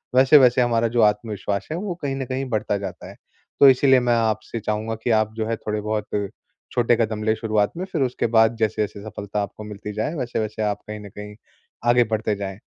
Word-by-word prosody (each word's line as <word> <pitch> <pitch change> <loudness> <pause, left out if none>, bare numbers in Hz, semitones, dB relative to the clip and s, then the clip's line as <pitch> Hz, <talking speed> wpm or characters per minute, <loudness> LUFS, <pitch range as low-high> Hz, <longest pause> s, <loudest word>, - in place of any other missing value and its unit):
वैसे-वैसे 130 -1 +6
हमारा 115 -1 +2
जो 120 +1 +1
आत्मविश्वास 105 -2 0
है 160 - -2
वो 190 0 -3
कहीं 135 -1 -1
न 135 - -3
कहीं 130 +2 -3
बढ़ता 110 -2 0
जाता 100 -2 -7
है। - - -12 0.5
तो 140 - +10
इसीलिए 130 0 +5
मैं 120 -1 +2
आपसे 110 0 -1
चाहूँगा 110 +2 -2
कि - - -1
आप 110 0 -4
जो 110 - -2
है 115 - 0
थोड़े 105 0 -3
बहुत 105 0 -2 0.7
छोटे 120 -1 +3
कदम 110 -2 -1
लें 110 - +2
शुरुआत 110 -2 0
में, 185 - -3
फिर 180 -6 -3
उसके 125 -2 -1
बाद 115 0 +4
जैसे-जैसे 105 -2 -1
सफलता 105 0 -4
आपको 105 +1 -8
मिलती 105 0 -7
जाए, 110 +9 -2
वैसे-वैसे 110 -5 -3
आप 105 -1 -1
कहीं 105 0 -6
न 100 - -10
कहीं 105 +1 -9 0.5
आगे 120 0 +5
बढ़ते 110 -1 0
जाएँ। 100 0 -6
110 Hz, 205 wpm, -23 LUFS, 105-120 Hz, 0.7 s, तो